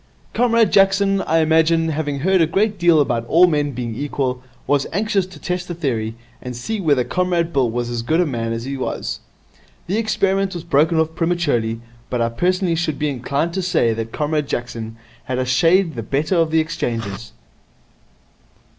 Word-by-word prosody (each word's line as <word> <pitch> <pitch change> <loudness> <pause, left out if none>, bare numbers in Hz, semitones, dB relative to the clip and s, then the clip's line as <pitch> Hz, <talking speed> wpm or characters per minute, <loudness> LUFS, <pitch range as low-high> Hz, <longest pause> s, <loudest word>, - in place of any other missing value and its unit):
'Comrade 230 -3 +3
Jackson, 195 0 +4
I 165 +1 +2
imagine, 160 +1 +3
having 145 -3 -2
heard 190 +2 +3
a 165 - +4
great 200 +3 0
deal 170 -2 +5
about 120 -5 +1
all 170 +7 +6
men 150 -4 +1
being 120 -3 -4
equal, 130 -1 -2 0.2
was 140 -1 +1
anxious 200 0 0
to 185 - -13
test 180 -1 -3
the 175 - -5
theory, 115 -9 -2 0.3
and 125 -1 -6
see 205 - -4
whether 145 -7 +2
Comrade 175 +1 -1
Bill 130 -4 +2
was 120 +1 -2
as 120 -1 -2
good 155 +8 0
a 180 - +3
man 115 -6 -3
as 115 0 -3
he 135 +2 -4
was. 130 - -4 0.7
The 195 +5 -1
experiment 195 -3 0
was 170 - -5
broken 160 0 +2
off 160 0 0
prematurely, 145 -10 0 0.3
but 125 - -2
I 115 0 +1
personally 180 - 0
should 160 -3 -1
be 150 - -1
inclined 140 +5 -2
to 190 - -1
say 170 -11 +1
that 115 0 -5
Comrade 150 +1 -1
Jackson 115 -3 -4 0.3
had 130 -2 -2
a 130 - 0
shade 165 +7 +3
the 120 - -4
better 145 - -1
of 165 -1 +2
the 160 0 +2
exchanges.' 115 - -4
155 Hz, 185 wpm, -20 LUFS, 125-180 Hz, 0.7 s, all